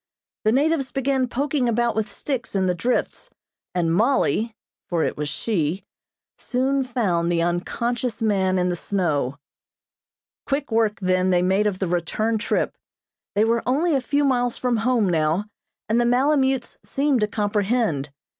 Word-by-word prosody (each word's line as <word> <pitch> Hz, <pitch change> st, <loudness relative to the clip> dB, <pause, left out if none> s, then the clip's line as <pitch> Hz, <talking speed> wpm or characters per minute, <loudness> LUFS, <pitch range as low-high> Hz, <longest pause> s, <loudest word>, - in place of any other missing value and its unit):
The 215 Hz, -, +5 dB
natives 280 Hz, +1 st, +2 dB
began 270 Hz, -1 st, 0 dB
poking 270 Hz, 0 st, 0 dB
about 235 Hz, 0 st, +1 dB
with 220 Hz, -1 st, -1 dB
sticks 260 Hz, -7 st, -4 dB
in 190 Hz, -1 st, +2 dB
the 180 Hz, -, +2 dB
drifts, 240 Hz, +8 st, -2 dB, 0.5 s
and 165 Hz, -2 st, +1 dB
Mollie 225 Hz, +1 st, +1 dB, 0.3 s
(for 170 Hz, -3 st, +1 dB
it -, -, -1 dB
was 150 Hz, 0 st, -3 dB
she) 185 Hz, -3 st, -1 dB, 0.6 s
soon 265 Hz, +2 st, 0 dB
found 190 Hz, -10 st, 0 dB
the 170 Hz, -1 st, +1 dB
unconscious 235 Hz, +7 st, -2 dB
man 190 Hz, -4 st, +1 dB
in 180 Hz, 0 st, +1 dB
the 175 Hz, -, 0 dB
snow. 155 Hz, -8 st, -1 dB, 1.1 s
Quick 280 Hz, -2 st, -1 dB
work 220 Hz, -2 st, +1 dB
then 185 Hz, 0 st, +2 dB
they 180 Hz, -1 st, +3 dB
made 190 Hz, +3 st, +2 dB
of 200 Hz, -3 st, -1 dB
the 190 Hz, -, -1 dB
return 195 Hz, +6 st, 0 dB
trip. 210 Hz, -, -1 dB, 0.6 s
They 210 Hz, -, +4 dB
were 230 Hz, +1 st, +2 dB
only 305 Hz, +7 st, +2 dB
a 270 Hz, -, +2 dB
few 285 Hz, +3 st, +1 dB
miles 245 Hz, -3 st, +1 dB
from 245 Hz, -2 st, 0 dB
home 230 Hz, -2 st, +2 dB
now, 165 Hz, +3 st, +1 dB, 0.4 s
and 230 Hz, +3 st, +2 dB
the -, -, +2 dB
malemutes 265 Hz, 0 st, +1 dB
seemed 275 Hz, -2 st, +1 dB
to 210 Hz, -, +2 dB
comprehend. 205 Hz, -, 0 dB
220 Hz, 155 wpm, -23 LUFS, 185-255 Hz, 1.1 s, The